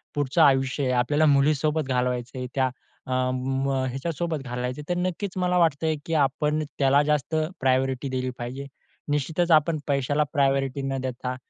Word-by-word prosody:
पुढचं 145 +2 +1
आयुष्य 135 -1 +3
आहे 130 - +1
आपल्याला 145 +5 +2
मुलीसोबत 150 +1 +2
घालवायचं 125 0 -1
आहे. 125 - -4
त्या 130 -1 +2 0.4
अ, 130 - -2 0.2
म 135 +1 -1 0.2
ह्याच्यासोबत 160 +4 -3
घालायचं 125 +3 -4
आहे 145 - -15
तर 175 - -2
नक्कीच 185 +1 -3
मला 180 0 +1
वाटतंय 160 -1 +2
की 165 - -3
आपण 150 +1 +1 0.2
त्याला 140 +1 +4
जास्त 150 +1 0 0.2
प्रायोरिटी 130 +1 +1
दिली 130 0 -2
पाहिजे. 125 +3 -6 0.5
निश्चितच 160 +4 0
आपण 155 +1 +4
पैशाला 145 +2 +1
प्रायोरिटी 135 -1 +1
न 135 0 -2
देता 125 0 -4
140 Hz, 155 wpm, -25 LUFS, 130-155 Hz, 0.5 s, त्याला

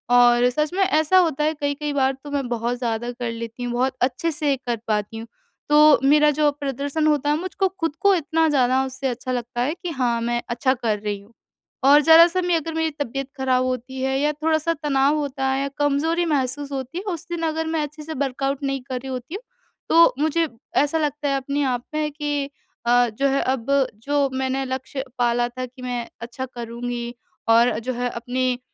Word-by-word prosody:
और 245 0 +6
सच 300 +5 -1
में 385 +1 +2
ऐसा 315 0 +3
होता 315 -5 +3
है, 310 +1 +2
कई-कई 290 0 -3
बार 265 -1 +2
तो 290 - -8
मैं 275 -3 -1
बहुत 240 +1 -1
ज़्यादा 240 -1 -2
कर 240 -1 -4
लेती 230 +1 -6
हूँ, 245 - -2
बहुत 255 +2 +1
अच्छे 260 +6 0
से 290 -2 +1
कर 245 -2 -3
पाती 210 +1 -1
हूँ। 225 +1 -7 0.4
तो 300 -3 +7
मेरा 300 +1 +5
जो 300 0 +2
प्रदर्शन 285 +3 -1
होता 290 -1 +2
है 295 - +2
मुझको 375 +1 -1
खुद 325 -2 -1
को 400 0 +5
इतना 325 0 +1
ज़्यादा 260 -2 +3
उससे 265 +1 -4
अच्छा 250 +1 -4
लगता 245 0 -3
है 280 +5 0
कि 350 - -2
हाँ, 245 -6 0
मैं 240 0 -1
अच्छा 255 +2 +1
कर 225 -5 -1
रही 205 -1 -3
हूँ। 205 +4 -20 0.5
और 285 +2 +7
ज़रा-सा 335 +3 +6
मैं 355 -1 +1
अगर 325 0 -2
मेरी 320 0 0
तबियत 275 0 -3
खराब 255 -1 +2
होती 255 +1 -4
है 265 0 0
या 295 +1 +2
थोड़ा-सा 315 +2 0
तनाव 280 0 +3
होता 275 -2 -2
है 270 +1 0
या 280 - -1
कमज़ोरी 295 +4 +1
महसूस 285 -2 -1
होती 265 +3 -5
है 370 - -4
उस 335 - -8
दिन 345 -1 -3
अगर 320 0 -2
मैं 320 -1 0
अच्छे 300 +1 -7
से 320 +1 -6
वर्कआउट 275 0 -2
नहीं 275 -1 -1
कर 255 -1 -2
रही 265 +1 -8
होती 255 +7 -6
हूँ 435 - -7 0.5
तो 335 +1 +6
मुझे 315 +2 +1 0.4
ऐसा 295 +2 0
लगता 295 -1 -1
है 275 - +1
अपने 280 +2 -2
आप 245 0 -2
में 305 -1 -1
कि 290 -1 -2 0.4
अ, 245 0 +4
जो 275 +6 0
है 275 +1 +1
अब 260 +1 0 0.3
जो 285 0 +1
मैंने 265 +1 -1
लक्ष्य 260 +1 -4
पाला 240 0 +2
था 255 +1 -5
कि 255 +1 -15
मैं 245 -2 -3
अच्छा 240 +3 -5
करूँगी 240 0 -5 0.4
और 235 +1 +5
जो 255 +2 -3
है 245 +1 -2
अपनी 250 +1 -2
270 Hz, 210 wpm, -22 LUFS, 245-300 Hz, 0.5 s, तो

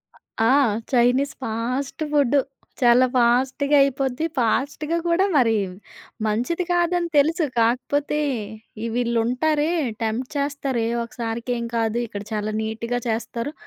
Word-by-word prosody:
ఆహ్, 225 +1 -2
ఆ! - - +5 0.4
Chinese 250 +3 +3
fast 250 +6 -3
food, 285 -2 +3 0.4
చాలా 245 +1 +6
ఫాస్ట్‌గా 260 +4 +2
అయిపోద్ది, 270 +1 -1
ఫాస్ట్‌గా 285 +7 0
కూడా 340 +3 +3
మరి 225 -4 +4 0.7
మంచిది 245 +12 0
కాదని 350 0 +1
తెలుసు 320 +3 +3
కాకపోతే, 280 +6 +1 0.6
ఈ - - -2
వీళ్ళుంటారే 245 +6 +1 0.3
టెంప్ట్ 235 +5 -2
చేస్తారు, 280 -3 -1
"ఏ, - - -1 0.2
ఒకసారికేం 235 0 -4
కాదు 225 +1 0
ఇక్కడ 205 -1 -6
చాలా 215 0 -2
నీట్‌గా 230 +2 -3
చేస్తారు" 230 +4 -3
250 Hz, 115 wpm, -23 LUFS, 230-285 Hz, 0.7 s, చాలా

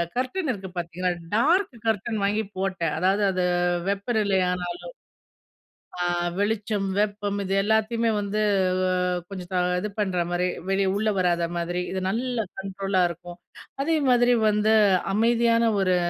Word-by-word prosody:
Curtain 265 +7 -1
இருக்கு 190 -4 -6
பாத்தீங்களா, 175 +1 -2 0.2
dark 320 - +2
curtain 220 +1 0
வாங்கி 210 +2 +1
போட்டேன். 185 -5 -1
அதாவது 195 +3 +2
அது 185 -1 -1 0.4
வெப்பநிலை 200 -1 +1
ஆனாலும். 180 -1 -4 1.2
ஆ, - - +1 0.3
வெளிச்சம், 210 -1 -1
வெப்பம் 205 -1 -1
இது 195 0 -2
எல்லாத்தையுமே 220 +2 +1
வந்து 205 +1 -2 0.5
அ - - +1 0.4
கொஞ்சம் 180 -1 -2
இது 210 - -3
பண்ணுற 185 -4 0
மாதிரி, 180 +1 +1 0.2
வெளி 195 0 +2
உள்ள 215 +1 +1
வராத 175 -2 +1
மாரி. 175 +1 -2
இது 190 - -2
நல்ல 240 0 -1
கண்ட்ரோலா 195 -1 -1
இருக்கும். 175 +1 -9 0.4
அதே 320 +3 +1
மாரி 245 0 +4
வந்து 210 +1 +2 0.4
அமைதியான 230 +2 +3 0.2
ஒரு 185 -1 +2
200 Hz, 130 wpm, -25 LUFS, 185-220 Hz, 1.2 s, மாரி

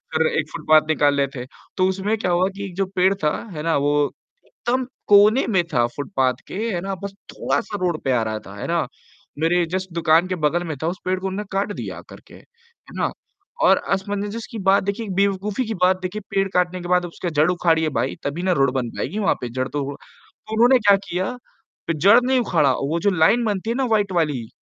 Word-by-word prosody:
फिर 160 0 +3
एक 155 -1 -1
फुटपाथ 155 -1 +3
निकाल 145 -2 +3
ले 140 -1 +1
थे, 125 - -5 0.3
तो 185 - +3
उसमें 200 +4 -1
क्या 185 -4 -1
हुआ 175 +2 +3
कि 200 0 -5
एक 185 -3 -9
जो 195 +1 0
पेड़ 185 +1 +4
था, 150 - +2 0.2
है 150 - -5
ना 165 0 +1
वो 145 +1 +1 0.5
एकदम 255 +1 -2 0.2
कोने 210 +5 +6
में 190 -6 +2
था 120 -2 +3
फुटपाथ 135 -4 0
के, - - -8 0.2
है 175 - -2
ना, 195 +1 -3
बस 200 - -5 0.2
थोड़ा-सा 215 -3 -2
रोड 175 -3 0
पे 135 - 0
आ 125 -2 +2
रहा 110 0 -3
था, - - -12
है - - -5
ना। - - 0 0.5
मेरे 170 +2 +2
जस्ट 185 0 -3
दुकान 165 +1 +3
के 185 - -2
बगल 165 +2 0
में 155 - -3
था, - - 0
उस 175 +2 -2
पेड़ 185 0 0
को 190 - -3
उन्होंने 195 +2 -3
काट 195 +1 -1
दिया - - -6
आकर - - -12
के, - - -17
है 470 0 -21
ना - - 0 0.5
और - - +6 0.2
असमंजस 205 +3 -3
की 230 - -6
बात 195 0 +5
देखिए, 205 +3 -3
एक 195 - -5
बेवकूफी 200 +4 0
की 225 - -2
बात 185 0 +4
देखिए, 185 +3 -4
पेड़ 195 0 +1
काटने 180 0 +1
के 175 - -6
बाद 180 0 +2
उसकी 175 +1 -5
जड़ 155 +3 +4
उखाड़िये 165 -3 +2
भाई, - - -1
तभी 150 +5 -3
ना 185 - +2
रोड 135 -1 +3
बन 125 -3 -1
पाएगी 215 - -3
वहाँ 205 - +2
पे 125 - -4
जड़ 130 +2 -2
तो 145 0 -3
तो 215 - -15
उन्होंने 245 +4 +5
क्या 205 -3 +5
किया 185 +5 -2 0.6
कि 165 - +1
जड़ 200 +10 +6
नहीं 260 +1 +2
उखाड़ा, 165 - +2
वो 145 +6 -1
जो 200 - +2
लाइन 185 +8 +3
बनती 210 +1 -2
है 235 - 0
ना 265 0 0
वाइट 205 -3 +2
वाली, 150 -9 0
185 Hz, 230 wpm, -22 LUFS, 155-200 Hz, 0.6 s, कोने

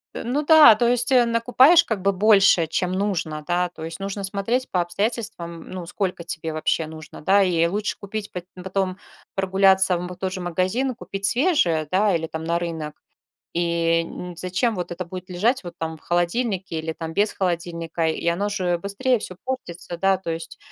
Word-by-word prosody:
Э, - - -5
ну 265 +6 -1
да, 310 -7 +9
то 235 +2 +1
есть, 245 +2 +1
э, 250 -2 +6
накупаешь 250 +8 +5
как 215 -4 -3
бы 200 +1 +3
больше, 195 -4 +5
чем 180 +3 -1
нужно, 185 -6 -2
да, 175 0 +1
то 165 -2 -11
есть, 165 +3 -6
нужно 195 0 -4
смотреть 205 +6 -1
по 180 - 0
обстоятельствам, 175 -2 -3
ну, 185 -2 -6
сколько 180 0 -3
тебе 160 -1 -5
вообще 155 0 0
нужно, 155 -1 -10
да. 195 +6 +4
И 170 -3 +2
лучше 205 +4 -2
купить, 205 +1 -6
пот 180 -1 -6 0.2
потом 190 0 -2 0.4
прогуляться 190 -1 +3
вот 180 +1 -5
в - - -7
тот 185 0 -3
же 190 - -5
магазин 185 +10 0
и - - -9
купить 195 -4 -5
свежее, 195 - +2
да, 195 +1 +3
или 165 -1 -2
там 160 0 -6
на 170 +1 +1
рынок. 160 -3 -5 0.6
И 170 -1 +1
н 175 +1 -8
зачем 190 +6 0
вот 180 -2 -4
это 180 +2 -4
будет 185 +1 -8
лежать 220 +8 +1
вот 175 -1 -7
там 160 0 -4
в - - -21
холодильнике 175 +1 -1
или 160 0 -4
там 160 0 -7
без 205 +3 +2
холодильника, 170 -2 -2
и 160 - -3
оно 195 +5 0
же 180 -4 0
быстрее 200 +7 0
всё 185 -3 -7
портится, 175 -10 -5
да, 195 0 +3
то 185 -2 -5
есть. 165 0 -6
185 Hz, 195 wpm, -23 LUFS, 170-205 Hz, 0.6 s, да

